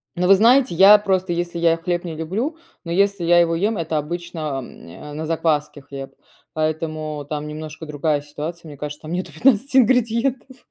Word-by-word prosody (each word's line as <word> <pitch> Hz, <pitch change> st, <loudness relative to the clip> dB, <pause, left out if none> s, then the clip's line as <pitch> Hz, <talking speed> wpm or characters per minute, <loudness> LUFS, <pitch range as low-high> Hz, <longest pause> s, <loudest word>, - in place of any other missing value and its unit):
Но 180 Hz, 0 st, 0 dB
вы 195 Hz, -, +8 dB
знаете, 240 Hz, +1 st, +4 dB
я 195 Hz, +4 st, +8 dB
просто, 190 Hz, -3 st, -1 dB
если 175 Hz, 0 st, -2 dB
я 165 Hz, -1 st, +3 dB
хлеб 175 Hz, +1 st, -2 dB
не 170 Hz, -3 st, -6 dB
люблю, 205 Hz, -, -3 dB, 0.3 s
но 170 Hz, -, -6 dB
если 200 Hz, +1 st, +1 dB
я 175 Hz, +1 st, +5 dB
его 165 Hz, -1 st, +2 dB
ем- 205 Hz, +5 st, 0 dB
это 160 Hz, -2 st, -2 dB
обычно, 170 Hz, +3 st, -5 dB, 0.2 s
м, 120 Hz, -, -13 dB
э, 150 Hz, -, -10 dB
на 155 Hz, +2 st, -4 dB
закваске 155 Hz, -2 st, -1 dB
хлеб, 140 Hz, -1 st, -9 dB, 0.4 s
поэтому 155 Hz, -1 st, -3 dB
там 150 Hz, 0 st, -4 dB
немножко 155 Hz, +1 st, -8 dB
другая 150 Hz, 0 st, -1 dB
ситуация, 155 Hz, +3 st, -7 dB
мне 145 Hz, -2 st, -10 dB
кажется, 145 Hz, +2 st, -7 dB
там 155 Hz, +2 st, -6 dB
нету 180 Hz, -2 st, -3 dB
15 260 Hz, -, +2 dB
ингредиентов, 250 Hz, +1 st, +1 dB
170 Hz, 185 wpm, -21 LUFS, 155-195 Hz, 0.4 s, вы